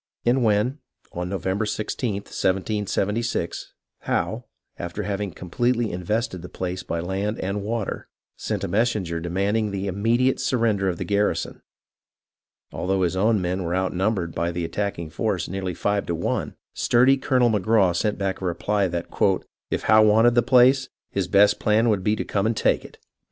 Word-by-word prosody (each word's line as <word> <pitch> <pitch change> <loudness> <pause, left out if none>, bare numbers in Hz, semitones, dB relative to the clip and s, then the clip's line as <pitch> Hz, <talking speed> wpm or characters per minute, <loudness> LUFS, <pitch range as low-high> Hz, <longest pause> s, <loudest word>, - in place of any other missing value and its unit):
And 125 +2 +3
when, 110 +6 +1 0.3
on 90 +1 -4
November 95 +2 -1
i6th, 105 0 -3 0.3
1776, 105 +1 -1 0.3
Howe, - - -2 0.3
after 85 +4 -4
having 100 0 -2
completely 120 +7 -1
invested 90 +2 -2
the 90 - -9
place 90 0 -4
by 85 - -3
land 95 +5 -2
and 100 +2 -2
water, 110 0 -3 0.3
sent - - -3
a - - -1
messenger 105 -6 0
demanding 100 +6 0
the 100 -1 -3
immediate 115 +7 +1
surrender 110 -6 +1
of 90 - -3
the - - -3
garrison, 105 0 0 1.1
although 95 0 0
his 90 +1 0
own 105 +1 +2
men 90 +2 -1
were 85 +1 -1
outnumbered 95 -1 0
by 85 - -1
the 85 0 -3
attack 100 +5 -2
ing 80 -2 -6
force - - -1
nearly 95 -1 -4
five 100 +3 -1
to 85 - -1
one, 85 - -2 0.2
sturdy 125 +3 +4
Colonel 125 -3 +2
Magraw 100 -3 +3
sent 105 +4 0
back 95 -1 -2
a - - -3
reply 100 +3 0
that 85 -1 -3 0.5
" - - -71
if - - -2
Howe 110 0 +6
wanted 110 +3 +5
the 120 - +4
place, 130 +2 +4 0.2
his 95 -3 -1
best 100 +2 +4
plan 110 +2 +3
would 100 -4 +1
be 105 +3 +2
to - - -3
come 100 +1 0
and 115 -1 -1
take - - +2
it - - -13
100 Hz, 170 wpm, -24 LUFS, 90-110 Hz, 1.1 s, Howe